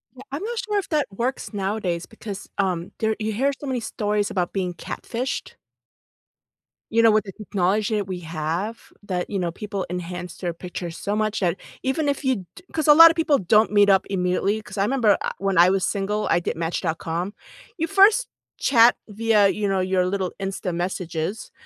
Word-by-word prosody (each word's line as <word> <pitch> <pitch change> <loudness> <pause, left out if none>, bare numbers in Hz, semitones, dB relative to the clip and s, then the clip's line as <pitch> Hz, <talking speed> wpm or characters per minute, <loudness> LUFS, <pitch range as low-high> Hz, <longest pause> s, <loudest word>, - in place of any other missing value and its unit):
Yeah, 255 - -11
I'm 295 +8 -4
not 470 +1 -3
sure 415 +1 -1
if 395 - -2
that 300 -3 +1
works 240 +4 -3
nowadays 195 -4 -2
because, 210 -3 -8
um, 185 -3 -1
there 220 0 +1
you 220 0 -2
hear 270 +6 +1
so - - -7
many 255 -2 -1
stories 210 -2 -1
about 180 -3 -2
being 180 -3 -1
catfished. 250 +8 -5 1.4
You 230 +1 +4
know, 225 -1 +6
with 215 -1 +3
the 195 - -7
technology 210 +1 0
that 205 -2 -1
we 185 -2 -4
have 165 +6 -3 0.3
that, 180 -3 -3
you 200 - -2
know, 175 -2 -1
people 200 0 -4
enhance 180 0 -5
their 175 -2 -3
pictures 175 -1 -7
so 205 +1 -2
much 215 0 0
that 175 -2 +1 0.3
even 270 +3 0
if 285 0 -1
you 255 -8 0
do 370 - -13
'cause 315 -1 -1
a 295 - +10
lot 330 +2 +10
of 330 - -1
people 315 -4 +3
don't 210 +4 +3
meet 205 -1 +5
up 190 -1 +4
immediately, 195 +3 0
'cause 210 - -11
I 195 - +2
'member 230 -4 +3
I - - -1
when 195 -2 0
I 175 +2 +7
was 190 0 +1
single, 205 +1 -1
I 170 - +4
did 170 - -3
match.com. 165 +2 -2 0.4
You 330 0 -1
first 410 +5 +5 0.3
chat 235 -2 +5
via, 215 -1 +3
you 205 +1 -1
know, 195 -1 +1
your 185 0 +1
little 190 -1 -1
Insta 195 -2 -3
messages. 175 +1 -3
200 Hz, 195 wpm, -23 LUFS, 180-230 Hz, 1.4 s, a